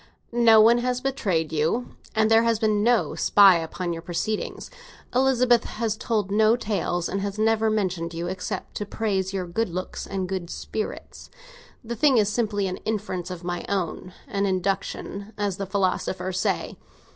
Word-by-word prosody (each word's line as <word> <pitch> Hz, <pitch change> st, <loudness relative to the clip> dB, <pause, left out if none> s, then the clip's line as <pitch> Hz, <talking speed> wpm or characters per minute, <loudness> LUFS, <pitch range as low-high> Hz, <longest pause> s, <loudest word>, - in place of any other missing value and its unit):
No 230 Hz, -2 st, +6 dB
one 230 Hz, +2 st, +6 dB
has 250 Hz, 0 st, -1 dB
betrayed 190 Hz, -, -1 dB
you, 160 Hz, +11 st, 0 dB, 0.3 s
and 220 Hz, 0 st, +3 dB
there 225 Hz, 0 st, +7 dB
has 230 Hz, -1 st, +2 dB
been 215 Hz, -2 st, +1 dB
no 235 Hz, +1 st, +2 dB
spy 195 Hz, -4 st, +6 dB
upon 170 Hz, +2 st, -4 dB
your 165 Hz, -, -6 dB
proceedings. 190 Hz, +5 st, -3 dB, 0.4 s
Elizabeth 250 Hz, -2 st, +3 dB
has 225 Hz, -1 st, -2 dB
told 215 Hz, -3 st, -1 dB
no 215 Hz, +2 st, +4 dB
tales, 200 Hz, -6 st, -1 dB
and 195 Hz, -, -2 dB
has 200 Hz, +1 st, -3 dB
never 220 Hz, 0 st, +2 dB
mentioned 185 Hz, -6 st, -1 dB
you 170 Hz, +1 st, -3 dB
except 185 Hz, +2 st, -5 dB
to 205 Hz, -, -3 dB
praise 195 Hz, -4 st, -1 dB
your 190 Hz, -2 st, -2 dB
good 190 Hz, +5 st, -1 dB
looks 185 Hz, +2 st, -5 dB
and 190 Hz, -1 st, -3 dB
good 180 Hz, -2 st, -4 dB
spirits. 215 Hz, +3 st, -6 dB, 0.5 s
The 235 Hz, +1 st, -5 dB
thing 270 Hz, +2 st, +4 dB
is 210 Hz, -2 st, +3 dB
simply 210 Hz, -3 st, 0 dB
an 185 Hz, -1 st, -3 dB
inference 200 Hz, -4 st, -3 dB
of 180 Hz, -1 st, -7 dB
my 175 Hz, 0 st, -3 dB
own—an 195 Hz, -, -3 dB
induction, 195 Hz, +2 st, -2 dB
as 205 Hz, -3 st, -1 dB
the 195 Hz, -1 st, -4 dB
philosophers 185 Hz, -1 st, -1 dB
say. -, -, -1 dB
200 Hz, 165 wpm, -25 LUFS, 185-225 Hz, 0.5 s, there